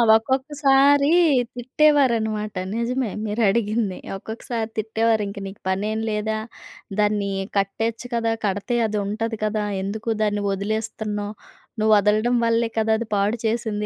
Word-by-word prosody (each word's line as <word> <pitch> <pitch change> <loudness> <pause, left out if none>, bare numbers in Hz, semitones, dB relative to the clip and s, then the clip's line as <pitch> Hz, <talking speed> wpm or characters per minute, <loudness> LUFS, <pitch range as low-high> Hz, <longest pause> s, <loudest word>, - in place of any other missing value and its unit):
ఒక్కొక్కసారి 275 +3 +3 0.5
తిట్టేవారనమాట. 240 -5 +2 0.2
నిజమే, 240 +1 -1 0.2
మీరడిగింది. 215 -1 +1 0.2
ఒక్కొక్కసారి 225 +2 -5
తిట్టేవారు, 220 0 +1
"ఇంకా 200 0 -7
నీకు 195 +1 -11
పనేం 210 +3 -1
లేదా, 215 0 -1 0.6
దాన్ని 205 -1 +1 0.3
కట్టేయొచ్చు 225 +5 -1
కదా! 230 -1 +1
కడితే 205 +5 -1
అదుంటది 215 +2 -2
కదా! 215 0 -1 0.2
ఎందుకు 215 +4 -4
దాన్ని 205 -1 0
ఒదిలేస్తున్నావు, 210 0 -3 0.4
నువ్వు 215 0 +3
వదలడం 215 +4 +2
వల్లే 230 0 +2
కదా! 220 0 +2
అది 235 - -4
పాడుచేసింది. 220 +1 -1
220 Hz, 110 wpm, -23 LUFS, 210-235 Hz, 0.6 s, ఒక్కొక్కసారి